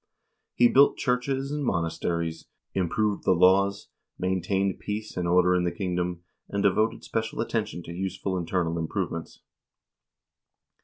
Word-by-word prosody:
He 120 - +6
built 140 +3 +5
churches 135 +2 -1
and 150 0 -2
monasteries, 85 -4 -2 0.3
improved 100 +3 0
the 95 - +4
laws, 95 +3 +3 0.3
maintained 95 +1 0
peace 105 +1 -5
and 90 -1 -1
order 90 +1 +4
in 90 -1 +2
the 90 - 0
kingdom, 90 -1 -2 0.3
and 100 0 -1
devoted 110 +3 +2
special 110 -1 -3
attention 110 -7 -2
to 85 - -8
useful 95 +1 -3
internal 85 -1 -1
improvements. 80 0 -4
95 Hz, 125 wpm, -27 LUFS, 85-105 Hz, 0.3 s, He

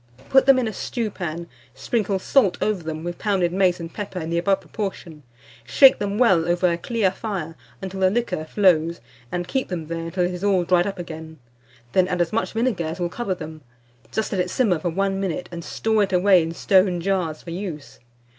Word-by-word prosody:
Put 265 0 +5
them 275 -1 +7
in 250 -3 +1
a 220 - -4
stewpan, 175 -10 -4 0.3
sprinkle 200 - -1
salt 195 0 +2
over 210 -4 0
them, 160 -1 -5
with 175 0 -5
pounded 185 -5 +1
mace 185 -2 +2
and 165 0 -7
pepper 200 -3 -5
in 160 0 -5
the 170 - +1
above 195 +2 +1
proportion; 190 -7 -6 0.4
shake 265 - +6
them 205 0 -2
well 190 -9 +4
over 175 +1 +2
a 170 - -1
clear 220 -2 0
fire 190 -6 -5 0.3
until 190 0 -5
the 190 -1 +4
liquor 205 -6 -1
flows, 170 -2 +2 0.3
and 175 0 -3
keep 260 +8 -1
them 170 -4 -4
there 165 +1 -4
until 180 +2 0
it 180 - -2
is 180 +1 -6
all 195 -3 +3
dried 175 +1 +2
up 195 - -4
again; 160 -2 -8 0.5
then 185 +4 +3
add 180 -1 -2
as 170 +1 0
much 225 - -1
vinegar 225 -7 0
as 160 +3 -5
will 175 -1 -1
cover 195 -1 -3
them; 155 -2 -9 0.5
just 220 0 -2
let 190 - +1
it 180 - -2
simmer 195 -7 +1
for 175 - -2
1 195 +3 -1
minute, 180 -2 -3
and 170 -1 -6
store 220 +4 0
it 200 - +1
away 185 0 +5
in 165 0 -3
stone 185 +1 +3
jars 170 -4 -1
for 170 - -8
use. 170 -5 -6
185 Hz, 210 wpm, -23 LUFS, 170-200 Hz, 0.5 s, them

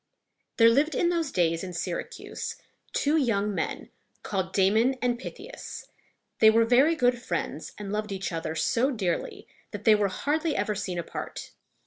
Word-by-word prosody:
There 230 - +7
lived 290 +6 +2
in 345 - +2
those 335 -5 0
days 165 -2 +1
in 185 -1 -6
Syracuse 475 - -5 0.4
two 295 +3 +2
young 210 -7 +1
men - - -3 0.3
called 190 -2 -2
Da´mon 220 +8 +3
and 245 -1 0
Pyth´i 400 - -8
as. - - -8 0.5
They 220 - +8
were 225 +1 +4
very 265 +8 +4
good 245 -4 +2
friends, - - -4
and 205 -1 -5
loved 210 0 -2
each 195 0 -3
other 160 -1 -3
so 235 - +2
dearly 200 -10 -3 0.2
that 205 -1 -7
they 220 - +7
were 210 -1 +3
hardly 300 - -1
ever 210 - 0
seen 190 -3 -4
apart. 170 - -6
220 Hz, 165 wpm, -27 LUFS, 195-270 Hz, 0.5 s, They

